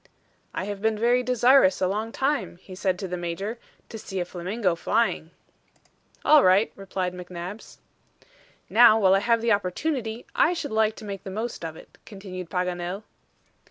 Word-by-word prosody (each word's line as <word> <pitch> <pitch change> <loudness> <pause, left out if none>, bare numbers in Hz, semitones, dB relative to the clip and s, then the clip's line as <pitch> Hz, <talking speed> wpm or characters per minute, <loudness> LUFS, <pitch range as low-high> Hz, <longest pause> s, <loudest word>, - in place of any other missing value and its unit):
"I - - -2
have 200 0 -5
been 220 0 +1
very 240 +3 +3
desirous 250 -4 +4
a 185 - +1
long 215 +4 -2
time," 270 -9 -1
he 185 +1 -13
said 185 -1 -1
to 190 - -5
the 180 0 -4
Major, 190 +7 -4 0.3
"to 225 - -7
see 190 -2 -5
a 175 - -1
flamingo 185 +2 -2
flying." 170 -1 0 1.0
"All 300 -2 +7
right," 190 +4 +4
replied 190 -2 -4
McNabbs. 180 +3 -8 0.9
"Now 225 -1 +6
while 190 -3 +5
I 195 - +4
have 230 +2 +2
the 230 0 +1
opportunity, 220 - -1
I 345 - +3
should 310 -7 -4
like 220 0 +2
to 220 - -10
make 200 -2 -6
the - - -7
most 220 +1 -5
of 160 -1 -5
it," - - -16
continued 185 -4 -8
Paganel. 180 +2 -3
200 Hz, 170 wpm, -25 LUFS, 180-230 Hz, 1.0 s, All